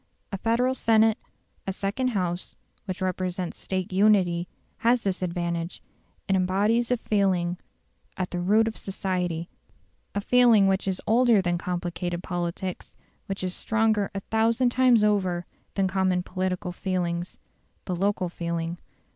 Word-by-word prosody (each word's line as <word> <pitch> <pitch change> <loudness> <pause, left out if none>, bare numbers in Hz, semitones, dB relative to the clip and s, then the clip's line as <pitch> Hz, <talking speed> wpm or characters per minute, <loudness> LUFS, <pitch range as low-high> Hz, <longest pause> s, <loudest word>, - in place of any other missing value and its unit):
A 195 - -2
federal 240 +4 +2
senate, 220 -3 +3 0.5
a - - +1
second 200 +7 -1
House, 180 -6 -2 0.3
which 185 -1 -4
represents 185 -1 -2
State 185 0 -3
unity, 185 -4 +3 0.3
has 240 +1 +2
this 195 -2 -1
advantage; 170 -1 -3 0.4
it 195 - +2
embodies 205 +6 +2
a 250 - +2
feeling 185 -5 +1 0.6
at 185 -1 -2
the 180 - -2
root 210 +5 +3
of 225 - -3
society 180 -4 -2 0.7
a - - +1
feeling 235 -3 +5
which 195 0 +1
is 190 -1 -2
older 235 -1 +5
than 175 -2 0
complicated 175 -1 -3
politics, 175 +1 -4 0.3
which 195 -1 -3
is 185 -1 -1
stronger 220 -2 +1
a 195 - -2
thousand 230 +4 +2
times 250 -3 +4
over 185 -4 +1 0.3
than 195 -1 +2
common 185 -1 +1
political 185 0 -2
feelings 175 -1 -2 0.5
the 180 - -2
local 195 0 0
feeling. 170 0 -3
190 Hz, 140 wpm, -26 LUFS, 180-215 Hz, 0.7 s, feeling